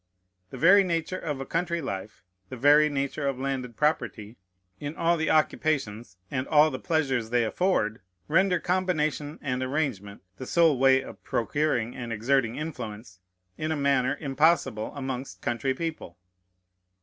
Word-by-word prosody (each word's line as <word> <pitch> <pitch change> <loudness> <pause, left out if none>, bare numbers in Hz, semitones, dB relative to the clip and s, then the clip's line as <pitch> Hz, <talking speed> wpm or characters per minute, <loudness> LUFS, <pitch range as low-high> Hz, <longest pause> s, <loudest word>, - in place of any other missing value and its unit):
The - - -9
very 195 +4 +6
nature 175 +1 -2
of 150 -4 -4
a 135 - -4
country 170 +2 -1
life, 105 -7 -6 0.3
the 130 - -7
very 145 +4 +5
nature 140 0 -2
of 135 -2 -1
landed 130 -3 -3
property, 115 -8 -1 0.4
in 145 +2 -5
all 170 +1 +2
the 160 -1 -1
occupations 125 - 0
and 130 +1 -2
all 155 0 +5
the 130 - -5
pleasures 135 -9 0
they 120 0 +2
afford, 110 - 0 0.3
render 190 -2 +3
combination 160 -5 -1
and 130 -3 -2
arrangement 130 -9 -3
(the 130 - -7
sole 165 -6 +3
way 135 0 +5
of - - -12
procuring 120 -2 -1
and 120 -2 -6
exerting 115 +1 +1
influence) 110 - -7 0.4
in 155 +1 -2
a 160 - -1
manner 140 -3 +1
impossible 135 -5 +1
amongst 135 -1 -5
country 125 +3 -1
people. 160 - -5
140 Hz, 150 wpm, -27 LUFS, 125-155 Hz, 0.4 s, very